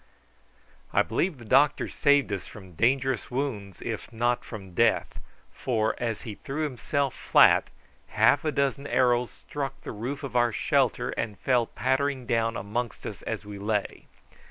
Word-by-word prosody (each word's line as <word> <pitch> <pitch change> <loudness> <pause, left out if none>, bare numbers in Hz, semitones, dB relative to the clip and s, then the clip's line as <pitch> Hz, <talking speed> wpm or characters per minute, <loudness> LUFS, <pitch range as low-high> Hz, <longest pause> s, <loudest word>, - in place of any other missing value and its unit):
I - - +4
believe 180 -5 -1
the 120 - -12
doctor 140 +6 +3
saved 145 -6 +2
us 95 - -4
from 95 -3 -12
dangerous 130 - +1
wounds, 120 -8 -4
if - - -5
not 120 +1 0
from 95 -5 -9
death, - - +1 0.3
for, 110 -4 0
as 115 -3 -2
he 110 - -6
threw 140 +8 -4
himself 140 0 -1
flat, - - +5 0.4
half 145 - +3
a 155 - 0
dozen 140 0 0
arrows 125 -2 +2
struck 135 -2 -6
the - - -6
roof 125 +7 -5
of 130 -3 -6
our 120 -1 +3
shelter, 100 - +1
and 105 -3 -3
fell 125 -3 +2
pattering 130 +2 -1
down 115 -1 0
amongst 110 +4 -4
us - - -6
as - - -4
we 105 -1 -8
lay. 105 0 -2
120 Hz, 155 wpm, -27 LUFS, 110-140 Hz, 0.4 s, flat